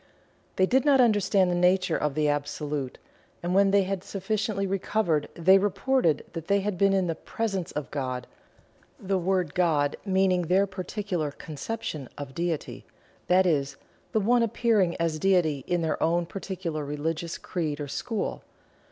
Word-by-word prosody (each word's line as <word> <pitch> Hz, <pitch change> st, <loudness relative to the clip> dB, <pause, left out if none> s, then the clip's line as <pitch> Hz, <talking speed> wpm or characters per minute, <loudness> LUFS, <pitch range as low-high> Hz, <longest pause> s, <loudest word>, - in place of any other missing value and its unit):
They 185 Hz, -, +4 dB
did 260 Hz, +7 st, +2 dB
not 280 Hz, -2 st, +4 dB
understand 205 Hz, -5 st, +3 dB
the -, -, +1 dB
nature 180 Hz, -1 st, +3 dB
of 150 Hz, -2 st, -1 dB
the 155 Hz, -1 st, +2 dB
Absolute, 145 Hz, -2 st, -2 dB, 0.5 s
and 175 Hz, +1 st, -1 dB
when 195 Hz, +1 st, +5 dB
they 200 Hz, 0 st, +4 dB
had 190 Hz, -1 st, -3 dB
sufficiently 200 Hz, +1 st, -2 dB
recovered 190 Hz, -4 st, 0 dB
they 190 Hz, +3 st, +5 dB
reported 200 Hz, -, +1 dB
that 165 Hz, -1 st, -6 dB
they 200 Hz, 0 st, +3 dB
had 205 Hz, 0 st, -2 dB
been 195 Hz, +2 st, +3 dB
in 190 Hz, -1 st, +2 dB
the 165 Hz, -, -1 dB
"presence 195 Hz, +1 st, -3 dB
of 150 Hz, -3 st, -5 dB
God" 130 Hz, -3 st, -3 dB, 0.7 s
the 195 Hz, -3 st, -1 dB
word 180 Hz, -3 st, 0 dB
"God" 155 Hz, -5 st, +2 dB
meaning 190 Hz, -2 st, +2 dB
their 185 Hz, +4 st, +3 dB
particular 185 Hz, -4 st, -3 dB
conception 155 Hz, -, -6 dB
of 140 Hz, -2 st, -7 dB
Deity 170 Hz, 0 st, -3 dB, 0.4 s
that 185 Hz, +1 st, +4 dB
is, 145 Hz, -5 st, 0 dB, 0.3 s
the 220 Hz, -, +2 dB
one 235 Hz, +4 st, +3 dB
appearing 215 Hz, -5 st, +2 dB
as 165 Hz, -2 st, 0 dB
Deity 165 Hz, -7 st, +2 dB
in 175 Hz, -1 st, 0 dB
their 160 Hz, -, -1 dB
own 170 Hz, +1 st, +2 dB
particular 180 Hz, -4 st, -5 dB
religious 155 Hz, +3 st, -3 dB
creed 155 Hz, -4 st, -3 dB
or 145 Hz, -, -4 dB
school. 220 Hz, -, -3 dB
180 Hz, 160 wpm, -27 LUFS, 155-195 Hz, 0.7 s, when